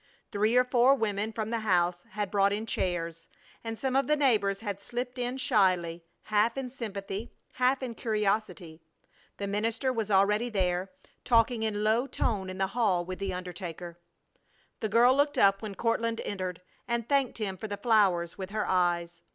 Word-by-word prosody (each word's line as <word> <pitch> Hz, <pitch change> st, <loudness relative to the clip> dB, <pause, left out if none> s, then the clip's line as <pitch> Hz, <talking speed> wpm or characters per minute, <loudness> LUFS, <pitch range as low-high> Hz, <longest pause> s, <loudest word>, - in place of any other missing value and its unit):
Three 215 Hz, +4 st, +2 dB
or 250 Hz, -, +6 dB
four 250 Hz, +2 st, +4 dB
women 215 Hz, -3 st, -1 dB
from 220 Hz, 0 st, -4 dB
the 230 Hz, -, 0 dB
house 175 Hz, -4 st, +1 dB
had 205 Hz, -2 st, -3 dB
brought 200 Hz, -1 st, +3 dB
in 210 Hz, +2 st, -2 dB
chairs, 170 Hz, -5 st, -2 dB, 0.4 s
and 225 Hz, -1 st, -5 dB
some 265 Hz, +1 st, -2 dB
of 275 Hz, -, +2 dB
the 300 Hz, -, +3 dB
neighbors 215 Hz, -9 st, +2 dB
had 200 Hz, -3 st, -4 dB
slipped 245 Hz, +3 st, -5 dB
in 245 Hz, +1 st, -2 dB
shyly, 185 Hz, -, +1 dB, 0.2 s
half 215 Hz, +3 st, +1 dB
in 260 Hz, -2 st, -4 dB
sympathy, 210 Hz, -3 st, -5 dB, 0.2 s
half 255 Hz, +1 st, +1 dB
in 245 Hz, -2 st, -4 dB
curiosity. 210 Hz, -7 st, -2 dB, 0.6 s
The 200 Hz, -, -3 dB
minister 225 Hz, +6 st, -1 dB
was 225 Hz, -3 st, -2 dB
already 210 Hz, +4 st, +3 dB
there, 185 Hz, -3 st, 0 dB, 0.3 s
talking 230 Hz, -1 st, +3 dB
in 220 Hz, -1 st, -1 dB
a -, -, -2 dB
low 220 Hz, +5 st, +2 dB
tone 200 Hz, -8 st, -1 dB
in 185 Hz, -, -6 dB
the 190 Hz, -, +1 dB
hall 195 Hz, -8 st, +1 dB
with 185 Hz, +1 st, -6 dB
the 195 Hz, -1 st, -2 dB
undertaker. 175 Hz, -1 st, -7 dB, 0.8 s
The 220 Hz, -, -2 dB
girl 235 Hz, +4 st, +5 dB
looked 285 Hz, +1 st, +2 dB
up 195 Hz, 0 st, +4 dB
when 210 Hz, -3 st, -6 dB
Courtland 230 Hz, +1 st, 0 dB
entered 185 Hz, -3 st, -4 dB, 0.2 s
and 235 Hz, -1 st, -1 dB
thanked 275 Hz, -2 st, +1 dB
him 205 Hz, -4 st, -3 dB
for 220 Hz, -, -6 dB
the 205 Hz, -1 st, -4 dB
flowers 200 Hz, -6 st, +2 dB
with 190 Hz, -1 st, -5 dB
her 215 Hz, +1 st, -2 dB
eyes. 175 Hz, -2 st, 0 dB
210 Hz, 180 wpm, -29 LUFS, 190-235 Hz, 0.8 s, or